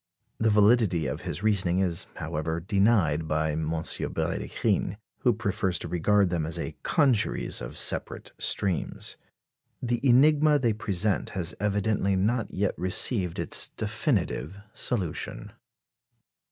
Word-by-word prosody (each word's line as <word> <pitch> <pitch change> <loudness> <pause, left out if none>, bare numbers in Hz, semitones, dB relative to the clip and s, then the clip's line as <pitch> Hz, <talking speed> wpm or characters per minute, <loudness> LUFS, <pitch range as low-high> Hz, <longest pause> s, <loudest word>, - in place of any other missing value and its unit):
The 110 - +2
validity 105 -5 +3
of 65 - -3
his 95 - -5
reasoning 95 -5 +2
is, 95 -1 0
however, 80 0 -3
denied 95 -5 +2
by 80 0 0
M. 75 0 -2
Brédikhine, 85 +3 -2 0.2
who 125 - +3
prefers 100 -3 -1
to - - -5
regard 100 +2 +2
them 85 -3 0
as 80 +1 -4
a 80 -2 -5
congeries 135 - +1
of - - -7
separate - - -2
streams. 95 -4 0 0.6
The 120 -1 -1
enigma 150 +3 +5
they 120 -5 +1
present 105 -1 -1
has 90 -1 0
evidently 105 -1 0
not 110 +5 0
yet 100 0 0
received 95 0 +2
its - - 0
definitive 85 +8 -2 0.2
solution. 95 -10 -3
100 Hz, 125 wpm, -27 LUFS, 85-110 Hz, 0.6 s, enigma